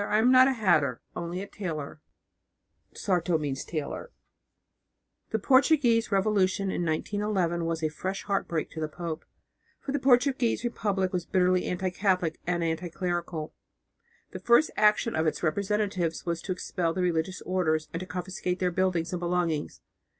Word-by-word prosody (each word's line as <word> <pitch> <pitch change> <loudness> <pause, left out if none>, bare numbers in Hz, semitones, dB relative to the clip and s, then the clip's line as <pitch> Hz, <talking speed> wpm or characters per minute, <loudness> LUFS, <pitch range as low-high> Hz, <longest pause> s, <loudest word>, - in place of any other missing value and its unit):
"I 210 +1 +1
am 235 +4 +4
not 255 0 +8
a 270 - +2
hatter, 155 - +2 0.2
only 175 +2 -4
a - - -8
tailor" 155 -7 -5 0.9
(sarto). 175 -3 +1
The 150 - -4 1.3
Portuguese 260 -2 +4
revolution 195 -1 +2
in 175 - -1
1911 175 0 -1
was 165 -1 -2
a 155 - +2
fresh 190 +5 -4
heartbreak 185 -5 -1
to 160 - -7
the 155 - -1
pope, 160 +1 -6 0.5
for 275 - -5
the 285 - 0
Portuguese 255 -2 +3
Republic 200 -6 -1
was 175 -2 -2
bitterly 180 -1 +2
anti 180 +1 -1
Catholic 180 -4 0
and 175 -1 0
anti 165 +2 -2
clerical. 175 -3 -3 0.8
The - - -6
first 240 +6 +4
action 215 +2 +3
of 160 +1 +1
its 155 - -2
representatives 190 -1 -1
was 170 -1 -2
to 195 - -5
expel 175 -2 -1
the 185 - 0
religious 175 +1 -1
orders 160 -4 0
and 165 - -2
to 185 - -7
confiscate 180 0 -3
their 180 -1 0
buildings 180 -1 0
and 180 - -1
belongings. 170 -3 -1
180 Hz, 150 wpm, -28 LUFS, 165-205 Hz, 1.3 s, not